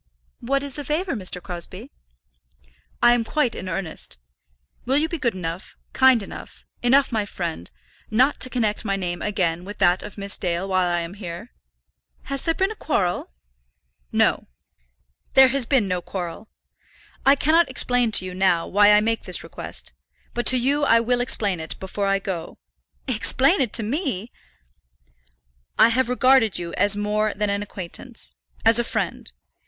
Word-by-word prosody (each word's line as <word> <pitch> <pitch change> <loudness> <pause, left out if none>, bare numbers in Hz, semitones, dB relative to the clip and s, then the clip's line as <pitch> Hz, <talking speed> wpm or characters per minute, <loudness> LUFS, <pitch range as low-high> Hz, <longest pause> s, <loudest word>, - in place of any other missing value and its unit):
"What 275 +3 -1
is 280 -1 -5
the 290 - -4
favour, 325 +4 -1
Mr. 185 -4 -1
Crosbie?" 175 -1 -7 1.1
"I 240 0 +7
am 240 -1 +1
quite 250 0 0
in 185 - -5
earnest. 165 - -4 0.7
Will 265 +3 +1
you 310 +2 +2
be 335 -1 -5
good 235 -7 0
enough, 175 0 -6 0.2
kind 260 -4 +5
enough, - - -11 0.2
enough 265 +3 +3
my 220 -2 0
friend, 170 - -5 0.4
not 255 +6 +2
to 255 - +2
connect 225 -5 0
my 200 -3 -1
name 175 -2 -3
again 180 -5 -1
with 205 +3 -9
that 180 -2 +3
of 210 - -10
Miss 200 0 -2
Dale 175 +1 -1
while 185 -2 +1
I 175 0 0
am 170 +2 -6
here?" 175 - -8 0.7
"Has 275 -1 -3
there 330 -1 0
been 385 +2 0
a - - -6
quarrel?" 185 - -1 0.8
"No; - - +2 0.9
there 265 -1 +8
has 265 -3 0
been 260 -8 +2
no 180 -1 -1
quarrel. 180 +3 -6 0.7
I 275 +1 +6
cannot 320 +4 +3
explain 245 -2 +1
to 185 - +6
you 185 - -6
now 185 -2 +2
why 205 +1 +5
I 210 - +5
make 225 +1 -1
this - - 0
request; - - -7 0.4
but 240 -1 -2
to 255 - +5
you 280 +4 +1
I 230 -5 +5
will 245 +1 0
explain 205 -7 +1
it 160 0 -7
before 200 +1 -3
I 195 0 +2
go." 190 -4 -5 0.5
"Explain 265 - +3
it 245 -5 0
to 230 - +3
me!" 240 - -3 1.5
"I - - +7
have 250 +1 +1
regarded 250 -3 +4
you 170 -1 -5
as 205 +1 +2
more 210 +1 0
than 205 0 -1
an 200 0 -1
acquaintance, 170 - -7 0.3
as 225 +1 +5
a - - +2
friend. - - -4
215 Hz, 170 wpm, -23 LUFS, 185-255 Hz, 1.5 s, there